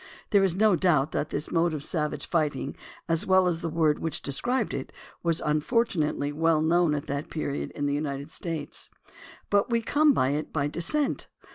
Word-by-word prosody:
There 200 -3 +5
is 185 -3 +2
no 210 -1 +4
doubt 160 -5 +2
that 150 - -2
this 145 - -3
mode 165 -1 +2
of 145 - -5
savage 150 -3 -2
fighting, 145 -5 -1 0.3
as 165 -1 +1
well 190 -1 +5
as 170 -2 -1
the 165 - -2
word 155 -2 +2
which 165 - -3
described 240 - -1
it, - - -4 0.3
was 165 -2 +1
unfortunately 150 - +1
well 160 +1 +2
known 165 -1 +3
at 145 +1 -4
that 140 +1 -4
period 145 -3 -3
in 145 - -2
the 140 - 0
United 145 0 -3
States. 165 -4 -5 0.6
But 205 +2 +3
we 230 -1 +1
came 300 +5 +4
by 130 - +2
it 150 +2 -3
by 145 -1 0
descent. 275 - 0
160 Hz, 185 wpm, -27 LUFS, 145-185 Hz, 0.6 s, There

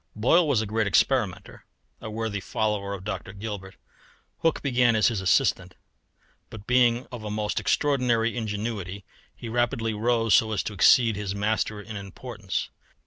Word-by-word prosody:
Boyle 155 +10 +3
was 125 -7 +2
a - - -4
great 110 +1 0
experimenter, 105 +1 0 0.4
a 110 - -6
worthy 110 -1 -3
follower 100 0 -2
of 95 - -10
Dr. 100 -1 -5
Gilbert. 100 -2 -7 0.6
Hooke 165 -1 0
began 125 -4 +3
as 110 - +4
his 110 -5 -3
assistant, 95 - +1 0.7
but 105 -2 -10
being 125 0 +3
of 120 -3 -7
a 105 - -5
most 105 0 -2
extraordinary 125 -6 +1
ingenuity 105 -4 -4 0.3
he 120 - -8
rapidly 115 -1 0
rose 115 0 +1
so 110 +2 +4
as 100 - -1
to 110 - -5
exceed 115 +3 +5
his 100 -1 -4
master 105 +1 -1
in 105 +1 -9
importance. 100 0 -5
110 Hz, 155 wpm, -26 LUFS, 100-120 Hz, 0.7 s, exceed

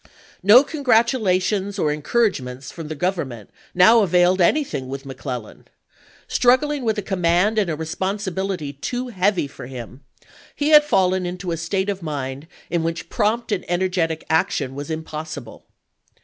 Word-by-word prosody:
No 215 +8 +8
congi'atulations 220 - +1
or 155 -6 +1
encouragements 145 - -1
from 165 -3 -8
the 155 - -5
Government 140 - -3 0.2
now 185 +6 +7
availed 180 -1 +3
anything 175 - +1
with 135 +1 -6
McClellan. 130 -4 -7 0.6
Struggling 265 +3 +2
with 220 -2 0
a 210 - -2
command 185 +3 +2
and 200 -4 0
a 160 - -1
responsibility 190 -1 -3
too 245 - -4
heavy 195 -5 +1
for 140 - -10
him, 125 0 -9 0.5
he 290 +1 0
had 300 -1 +8
fallen 190 -9 +1
into 180 0 -5
a - - 0
state 190 +4 -1
of 195 -2 -3
mind 140 -2 -5 0.2
in 170 -1 +1
which 165 0 -3
prompt 225 +2 0
and 200 -3 -1
energetic 175 -3 0
action 160 -4 0
was 140 +2 -7
impossible. 155 -5 -7
180 Hz, 145 wpm, -22 LUFS, 155-210 Hz, 0.6 s, No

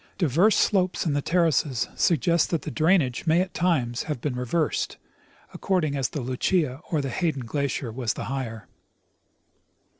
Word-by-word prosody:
Diverse 175 - +3
slopes 185 -4 +1
in 155 - +1
the 145 - 0
terraces 155 -7 +1
suggest 170 0 +2
that 165 - -1
the - - -5
drainage 160 -5 +1
may 160 +2 +4
at 185 0 -1
times 135 -10 0
have 150 - -2
been 130 +1 -3
reversed, 125 +6 -1 0.5
ac - - -10
cording 175 -7 0
as 135 -3 0
the 150 - -4
Lucia 130 +3 0
or 155 -3 0
the 135 - -3
Hayden 155 -5 -1
glacier 140 -1 -2
was 120 -1 -2
the - - -5
higher. 125 -5 -5
150 Hz, 160 wpm, -25 LUFS, 130-170 Hz, 0.5 s, may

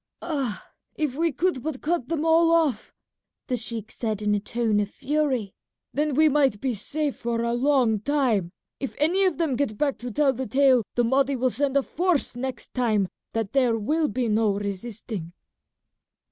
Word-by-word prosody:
"Ah! 275 -10 -3 0.3
if 300 -5 -1
we 330 +4 +1
could 345 -1 0
but 300 -1 -4
cut 310 -5 -1
them 325 -1 -1
all 330 +1 +5
off," 315 -9 +1 0.5
the 250 - -1
sheik 225 -2 -5
said 215 -3 -3
in 210 0 +2
a 205 - +2
tone 220 0 0
of 205 -1 -1
fury, 265 -6 -1 0.4
"then 295 -1 0
we 310 +2 +5
might 275 -7 +2
be 260 +1 -1
safe 290 +7 -2
for 235 -1 -2
a 235 0 0
long 245 -4 +2
time. 230 -8 +1 0.3
If 270 - -4
any 355 +6 +3
of 370 - +1
them 320 -6 0
get 245 -6 -1
back 280 +1 0
to 245 - -5
tell 275 +3 +2
the 260 +1 -4
tale 260 +1 +4
the 240 - +3
Mahdi 270 +3 +2
will 255 0 +1
send 280 +2 0
a 275 - +3
force 345 -5 0
next 260 +1 -5
time 215 -7 +1 0.2
that 225 -1 -2
there 250 -4 +3
will 305 +9 +1
be 255 -4 -1
no 215 -1 +2
resisting." 200 -3 -5
260 Hz, 185 wpm, -25 LUFS, 225-295 Hz, 0.5 s, all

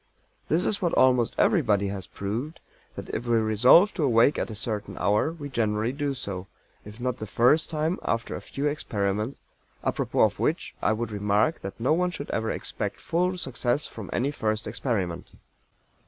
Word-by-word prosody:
This 165 +4 +2
is 210 - 0
what 175 -3 +1
almost 125 -3 +4
everybody 105 - +3
has 95 -1 -5
proved, 115 +11 -4 0.4
that - - -7
if 120 +2 -4
we 120 -1 +3
resolve 115 - +5
to 160 - -1
awake 120 +1 +4
at - - -2
a 110 - -6
certain 105 -3 -3
hour 105 - +2
we 155 -4 -7
generally 110 -3 0
do 140 0 -2
so; 95 -6 -5 0.4
if 105 +2 -11
not 125 0 -2
the 110 - -6
first 125 +9 +3
time, 160 +2 -1
after 115 0 -1
a - - -6
few 140 - -4
experiments, 105 -5 -1 0.4
apropos - - 0
of - - +3
which - - -1
I - - +2
would 110 0 -2
remark 105 +9 +1
that 95 - -7
"no 125 +6 +2
one 180 +2 +2
should 145 -5 -6
ever 110 0 -1
expect - - -4
full 180 +2 0
success 130 -2 -1
from 105 -5 -8
any 135 +4 0
first 110 -6 -1
experiment." 100 -6 -2
120 Hz, 180 wpm, -26 LUFS, 105-145 Hz, 0.4 s, resolve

